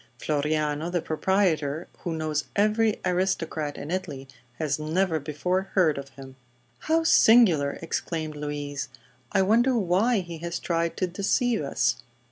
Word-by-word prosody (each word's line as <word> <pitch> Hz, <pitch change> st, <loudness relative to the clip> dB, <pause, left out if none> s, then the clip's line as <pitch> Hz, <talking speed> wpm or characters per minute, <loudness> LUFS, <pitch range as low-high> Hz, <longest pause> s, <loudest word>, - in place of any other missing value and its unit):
Floriano, 150 Hz, +2 st, -1 dB
the 175 Hz, 0 st, 0 dB
proprietor, 160 Hz, -2 st, 0 dB
who 170 Hz, -2 st, -4 dB
knows 155 Hz, -1 st, -2 dB
every 215 Hz, +1 st, +2 dB
aristocrat 165 Hz, -5 st, -1 dB
in 145 Hz, -, -6 dB
Italy, 155 Hz, -8 st, -4 dB, 0.3 s
has 145 Hz, +2 st, -2 dB
never 160 Hz, +2 st, 0 dB
before 180 Hz, +6 st, -2 dB
heard 160 Hz, -7 st, +3 dB
of 135 Hz, 0 st, -9 dB
him." 130 Hz, -1 st, -13 dB, 0.4 s
"How 325 Hz, +1 st, +1 dB
singular!" 210 Hz, -, +5 dB
exclaimed 160 Hz, -1 st, -3 dB
Louise. 145 Hz, -2 st, -4 dB, 0.4 s
"I 190 Hz, -, +3 dB
wonder 235 Hz, +6 st, +3 dB
why 200 Hz, +3 st, +2 dB
he 170 Hz, -2 st, -8 dB
has 170 Hz, +1 st, -4 dB
tried 170 Hz, -1 st, -1 dB
to 185 Hz, -, +1 dB
deceive 210 Hz, +6 st, 0 dB
us." 140 Hz, -, 0 dB
165 Hz, 135 wpm, -26 LUFS, 150-190 Hz, 0.4 s, singular